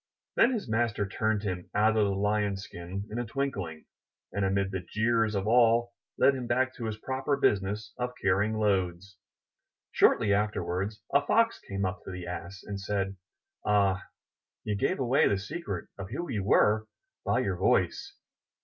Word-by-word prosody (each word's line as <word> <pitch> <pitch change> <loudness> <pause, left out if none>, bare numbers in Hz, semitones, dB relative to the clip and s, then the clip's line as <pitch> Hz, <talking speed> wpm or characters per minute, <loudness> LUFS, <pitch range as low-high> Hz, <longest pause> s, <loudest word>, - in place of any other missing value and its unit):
Then 240 - +5
his 220 - -3
master 110 -2 0
turned 110 +1 0
him 90 -3 -4
out 110 +2 +4
of 110 - +4
the 100 -1 0
Lion's 105 -1 0
skin 95 +3 -7
in 115 - -3
a - - 0
twinkling, 100 - -3 0.5
and, 100 +1 -1
amid 95 0 +1
the 95 - -2
jeers 110 +4 +1
of 100 0 -1
all, 120 +1 +4 0.2
led 140 - +5
him 130 -3 -4
back 130 +2 +1
to 120 - -6
his 110 -1 -3
proper 135 +4 -1
business 105 -3 0
of 125 0 -2
carrying 100 +3 +1
loads. 95 -2 0 0.8
Shortly 105 -3 +4
afterwards 100 0 -1
a 140 +1 +5
Fox 230 +8 +2
came 100 0 -3
up 95 +2 -3
to - - -7
the 90 -1 -6
Ass 90 +2 -7
and 100 -1 -5
said, 95 -1 -2 0.5
Ah, 100 -2 +2 0.6
you 105 - -1
gave 160 - 0
away 130 +1 +3
the 100 - +2
secret 100 - -5
of 95 0 -6
who 155 +9 -4
you 105 -5 -1
were 110 +2 +3 0.4
by - - +1
your - - -1
voice. 400 - +1
105 Hz, 170 wpm, -29 LUFS, 95-120 Hz, 0.8 s, Then